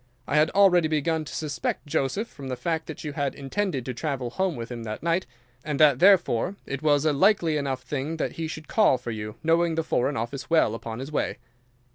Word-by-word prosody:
I - - -1
had 150 +1 +4
already 180 -5 +5
begun 155 +1 0
to - - -8
suspect 150 -3 -3
Joseph, 145 - -1
from 140 -9 -10
the 130 - -2
fact 160 +6 -2
that 160 - -7
you 150 -2 -4
had 140 -1 -2
intended 140 - -2
to 130 - -3
travel 130 -3 -3
home 185 +2 -1
with 115 0 -6
him 120 -1 -5
that 110 +3 -6
night, 170 +2 0 0.4
and 150 -2 -3
that 145 -4 +6
therefore 185 - +4
it 140 0 -4
was 150 -1 +3
a 155 - +3
likely 170 0 +3
enough 135 -3 -2
thing 145 +4 -3
that - - -1
he 165 -1 -4
should 155 0 -7
call 210 - +4
for 120 - -6
you, 105 -1 -5
knowing 165 +1 +2
the 165 - 0
Foreign 140 -1 0
Office 120 +6 -4
well, 160 -9 +3
upon 115 0 -6
his 135 +4 -6
way. - - -1
150 Hz, 220 wpm, -26 LUFS, 130-165 Hz, 0.4 s, that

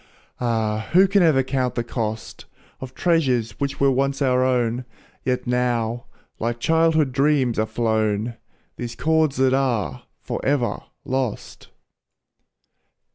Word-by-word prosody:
Ah! 110 -3 -1
who 190 +3 +7
can 200 +1 +3
ever 155 -6 +4
count 130 -1 -1
the 120 - -1
cost, 110 -2 -5 0.3
Of 130 -1 -9
treasures 130 - +1
which 140 0 -2
were 140 0 +4
once 135 +1 0
our 130 -2 +2
own, 125 -1 +1 0.4
Yet 125 -1 -1
now, 120 -1 0 0.3
like 120 +1 -2
childhood 160 -1 +2
dreams 135 -4 +2
are 110 - +1
flown, 110 0 0 0.4
Those 120 -1 -5
cords 160 -3 +1
that 130 0 +2
are 115 - 0 0.2
forever 125 -6 -1 0.2
lost. 130 -4 -3
125 Hz, 125 wpm, -22 LUFS, 115-140 Hz, 0.4 s, who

